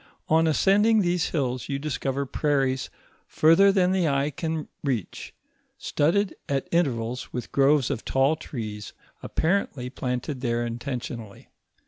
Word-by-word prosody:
On 160 +1 +4
ascending 205 +7 +4
these 175 -2 0
hills, 130 -5 -2
you 140 - -1
discover 140 -1 -2
prairies 135 -2 0 0.4
further 165 +6 +5
than 185 -2 +2
the 185 -3 +2
eye 140 +1 +1
can 160 +1 -3 0.2
reach, 125 - -3 0.5
studded 175 +6 +1 0.2
at 140 -1 -1
intervals, 125 -7 -1
with 125 - -5
groves 140 -1 +3
of 110 - -3
tall 135 +4 +2
trees, 110 -9 -7 0.3
appa - - -3 0.3
rently 125 -1 -8
planted 125 +2 -3
there 120 -1 0
intentionally. 120 -3 -6
140 Hz, 130 wpm, -25 LUFS, 125-160 Hz, 0.5 s, further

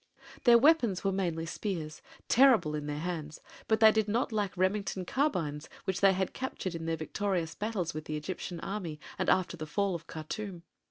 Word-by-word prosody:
Their 240 -1 +8
weapons 240 - +4
were 195 - +2
mainly 170 -4 -1
spears, 165 -3 -4 0.3
terrible 240 - +5
in 150 -1 -3
their 145 0 -3
hands; 160 -3 -4 0.3
but 220 0 +2
they 220 -1 +9
did 220 -1 +1
not 235 +4 0
lack 205 -3 0
Remington 190 0 0
carbines 170 - -1
which 190 0 -2
they 195 -1 +6
had 190 0 -1
captured 255 -8 -4
in 165 -1 -5
their 165 0 0
victorious 170 0 -2
battles 205 -5 -2
with 155 0 -6
the 155 - -3
Egyptian 170 +2 -5
army 180 -7 -4 0.2
and - - +1
after 185 -1 +2
the 155 -2 -6
fall 200 +4 0
of 165 -1 -6
Khartûm. 170 +3 -6
185 Hz, 185 wpm, -31 LUFS, 160-210 Hz, 0.3 s, they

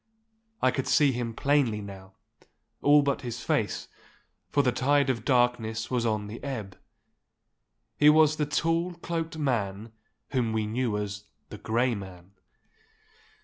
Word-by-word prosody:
I 130 - +5
could 135 - -3
see 145 -2 +4
him 120 -2 -4
plainly 140 -6 +2
now—all 100 +8 -2
but 140 -1 0
his 120 -4 -6
face, - - -1 0.6
for 145 - +2
the 125 - +2
tide 140 +2 +2
of 115 -4 -5
darkness 120 -3 +1
was 120 -2 +1
on 105 -2 -1
the 105 +3 -9
ebb. 110 -9 -5 1.2
He 150 - +7
was 155 0 +5
the 150 -1 0
tall, 165 +4 0
cloaked 165 -1 -4
man 110 -7 -2 0.4
whom 120 -5 0
we 110 -1 0
knew 115 0 -1
as 105 0 -5 0.2
the - - -9
Grey 120 +3 +1
Man. 95 -3 -9
125 Hz, 140 wpm, -27 LUFS, 110-145 Hz, 1.2 s, He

